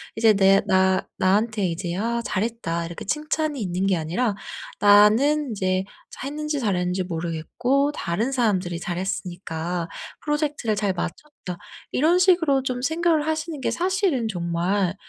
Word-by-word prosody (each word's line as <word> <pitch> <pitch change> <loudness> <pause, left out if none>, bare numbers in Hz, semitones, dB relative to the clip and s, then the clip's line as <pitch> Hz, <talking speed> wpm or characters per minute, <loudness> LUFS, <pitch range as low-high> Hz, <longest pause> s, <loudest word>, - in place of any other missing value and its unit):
이제 220 -1 +5
내 195 0 +5
나 190 0 +3
나한테 205 +1 +2
이제 175 0 -3
'아 235 +4 -1
잘했다.' 200 -7 -2
이렇게 170 +3 -7
칭찬이 300 +1 -1
있는 185 -1 -1
게 195 -1 +3
아니라 180 +8 -1 0.5
'나는 225 +9 +5
인제 185 -2 0 0.3
자했는지 295 +2 -4
잘했는지 185 -4 0
모르겠고 180 - -1
다른 210 +8 -2
사람들이 190 -9 0
잘했으니까 175 -2 -3 0.3
프로젝트를 295 -7 -1
잘 200 -1 0
마쳤다.' 180 - -6 0.3
이런 330 +6 +3
식으로 335 -7 +3
좀 250 -1 -2
생각을 320 +1 +1
하시는 315 -1 -3
게 230 - 0
사실은 355 - 0
정말 180 +1 -1
210 Hz, 315 characters per minute, -24 LUFS, 180-285 Hz, 0.5 s, 이제